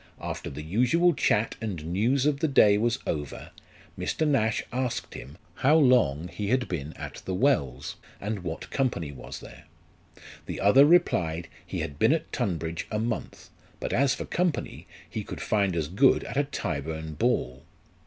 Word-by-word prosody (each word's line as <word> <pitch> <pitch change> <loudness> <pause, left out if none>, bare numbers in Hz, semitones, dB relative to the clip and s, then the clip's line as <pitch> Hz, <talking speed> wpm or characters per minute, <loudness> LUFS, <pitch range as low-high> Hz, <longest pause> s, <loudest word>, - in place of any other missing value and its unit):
After - - -5
the 75 +2 -7
usual 125 - +3
chat 110 -6 +1
and 95 -9 -4
news 115 - +1
of 145 -2 +2
the 160 - +2
day 105 -7 +6
was 120 +2 +1
over, 75 -3 -4 0.4
Mr. 155 - -1
Nash 110 -6 +2
asked 125 -2 -2
him, 70 +6 -9 0.2
how 145 +4 +4
long 120 - +4
he 100 +3 -5
had 125 +3 +1
been 80 -3 -4
at - - -8
the 95 - -2
Wells, 70 - 0 0.2
and 105 +1 -3
what 80 -2 -6
company 115 - -1
was 65 - -9
there? - - -13 0.8
The - - -4
other 135 +9 +6
replied, 85 - +2
he - - -4
had 70 0 -5
been 115 +7 +5
at 160 -1 -3
Tunbridge 85 - -2
a 105 - -2
month: 115 +1 -4 0.3
but - - -3
as 135 +1 +3
for - - -5
company, 175 -4 -2 0.2
he - - -5
could - - -7
find 100 -4 +1
as 80 -3 -1
good 115 - +4
at - - -7
a 145 +1 +2
Tyburn 80 - -4
ball. 65 -3 0
105 Hz, 170 wpm, -27 LUFS, 80-135 Hz, 0.8 s, day